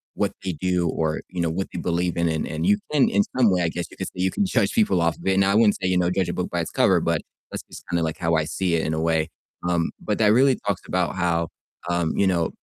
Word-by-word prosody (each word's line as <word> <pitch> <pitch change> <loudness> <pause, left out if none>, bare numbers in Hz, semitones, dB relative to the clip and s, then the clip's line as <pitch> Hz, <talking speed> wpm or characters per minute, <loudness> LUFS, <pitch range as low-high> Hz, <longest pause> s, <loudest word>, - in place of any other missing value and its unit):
what - - 0
they 95 - -1
do, 90 +1 0
or, 80 -1 -1
you 90 - -6
know, 85 - +1
what 95 +4 -2
they - - -5
believe 85 0 -1
in. 85 - +2
And 80 -1 -1
and 80 +1 -3
you 100 +1 +4
can 145 -3 +4
in 100 - +3 0.2
some 115 -6 +5
way, 90 -1 +2
I 85 - +1
guess 85 +1 -4
you - - -14
could - - -4
say, - - -10
"You 95 - +1
can 205 - 0
judge - - +1
people 210 - +2
off 85 0 +1
of - - -8
it." 95 0 +3
Now 95 0 +3
I 100 - +2
wouldn't 110 -2 +5
say, 95 - -1
you 90 - +2
know, 90 -1 +2
judge 90 -1 0
a - - -2
book 90 - -3
by 85 - -2
its - - -5
cover, - - +3
but - - 0 0.3
that's - - -5
just - - -11
kinda 85 -1 0
like, 80 -1 -2
how 85 -2 0
I 80 -1 +1
see 90 +2 -1
it 80 - 0
in 80 - -1
a 80 - -2
way. 80 -1 +1 0.4
Um, 85 -2 0
but 105 - -1
that 105 -2 +4
really 130 +1 +5
talks 100 -2 0
about 90 0 -1
how, 85 -2 0 0.4
um, 85 -2 0
you 100 - +3
know, 85 -3 +1
90 Hz, 300 wpm, -23 LUFS, 85-95 Hz, 0.4 s, some